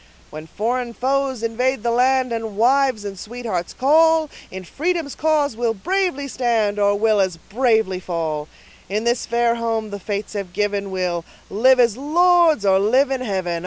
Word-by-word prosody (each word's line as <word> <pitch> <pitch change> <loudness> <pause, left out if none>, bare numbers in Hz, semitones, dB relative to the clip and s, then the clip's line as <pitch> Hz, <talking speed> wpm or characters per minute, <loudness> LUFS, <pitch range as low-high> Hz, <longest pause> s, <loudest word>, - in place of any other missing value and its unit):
When 155 +1 -9
foreign 235 +5 -3
foes 265 -2 -1
invade 245 +1 -1
the 235 - 0
land, 255 +1 +2
And 225 -3 -4
wives 255 -2 +2
and 195 -2 -6
sweethearts 220 -6 -5
call, 320 +3 +3 0.2
In 190 0 -8
freedom's 320 - -2
cause 300 -5 0
we'll 230 -1 -1
bravely 355 - -1
stand 230 -5 0
Or 205 0 +3
will 215 0 +2
as 185 -3 -1
bravely 220 -1 0
fall; 160 -4 -3 0.4
In 210 +3 -1
this 235 +1 0
fair 235 0 +1
home 225 -2 -2
the 200 - -6
fates 200 +1 -5
have 195 -4 -5
given 205 0 -1
We'll 180 -3 -2 0.3
live 255 +5 +4
as 235 -2 +3
lords, 330 - +3
or 190 -1 +4
live 255 +7 +2
in 265 -1 -1
heaven. 185 -7 -2
230 Hz, 165 wpm, -20 LUFS, 200-265 Hz, 0.4 s, live